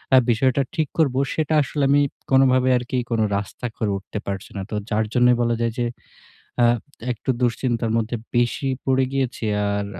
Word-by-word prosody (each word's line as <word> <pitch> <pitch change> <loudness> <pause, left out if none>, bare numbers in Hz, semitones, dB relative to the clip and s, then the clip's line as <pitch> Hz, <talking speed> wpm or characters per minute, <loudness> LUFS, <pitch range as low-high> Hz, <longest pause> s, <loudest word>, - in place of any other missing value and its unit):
আ - - +8
বিষয়টা 130 +4 +2
ঠিক 155 -4 +1
করব, 140 -5 +3 0.2
সেটা 155 -1 -1
আসলে 145 +1 -2
আমি 145 +1 +5 0.3
কোনোভাবে 130 -1 +4
আরকি 125 +1 -3
কোন 115 -1 +1 0.2
রাস্তা 100 +4 -5
করে 105 -2 0
উঠতে 100 +2 -6
পারছি 100 -1 -5
না। - - -2
তো - - -2
যার 110 0 +1
জন্যই 125 0 +5
বলা 120 0 +1
যায় 115 0 +1
যে 120 - +1 0.8
আ - - +6 0.5
একটু 120 +3 -3
দুশ্চিন্তার 120 -1 0
মধ্যে 115 +1 -2 0.2
বেশি 120 +3 +1 0.2
পড়ে 130 0 +2
গিয়েছি। 130 -4 -2 0.2
আর 100 0 -1
125 Hz, 175 wpm, -22 LUFS, 115-135 Hz, 0.8 s, আ